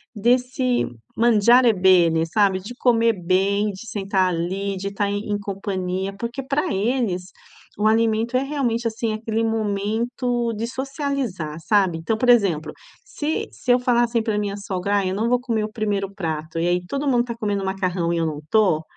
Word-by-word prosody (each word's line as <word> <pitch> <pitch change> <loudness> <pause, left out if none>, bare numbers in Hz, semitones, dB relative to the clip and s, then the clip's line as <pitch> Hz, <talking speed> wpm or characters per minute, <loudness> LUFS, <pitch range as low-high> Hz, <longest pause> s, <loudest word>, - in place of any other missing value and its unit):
desse 250 +3 +1 0.3
mangiare 235 +1 +5
bene, 180 -4 +4
sabe, 195 +1 +2
de 205 +6 -9
comer 230 -2 +3
bem, 200 +3 +2
de 200 +4 -10
sentar 195 -2 0
ali, 190 +3 -2
de 195 +2 -4
estar 200 0 -1
em 205 +1 -3
em 205 - -1
companhia, 195 -1 -3
porque 240 +4 -4
pra 280 +2 -1
eles 205 -3 0 0.5
o 210 +1 +2
alimento 225 +2 +2
é 265 - 0
realmente, 245 -5 -1
assim, 225 0 -2
aquele 220 +1 -2
momento 225 +3 -1
de 225 +2 -3
socializar, 265 - -3
sabe, 190 -5 +3
então 165 +7 -1
por 245 +3 0
exemplo, 185 -10 +3 0.3
se 305 +2 -3
se 250 - -2
eu 245 - +3
falar 245 -1 +2
assim 235 -1 0
pra 220 -2 -1
minha 205 -1 -2
sogra: 200 -1 -2
"Ah, 195 - -1
eu 185 - -2
não 220 +3 0
vou 250 0 +3
comer 230 -3 -1
o 215 - -4
1º 205 -3 -2
prato." 160 -4 -4
e 170 - +1
aí 180 0 0
todo 280 +9 -3
mundo 245 -3 +3
tá 235 -1 -5
comendo 205 -4 -2
macarrão 185 -3 -1
e - - 0
eu 165 - +1
não 150 -2 -4
tô, 190 -8 +3
210 Hz, 185 wpm, -22 LUFS, 190-235 Hz, 0.5 s, mangiare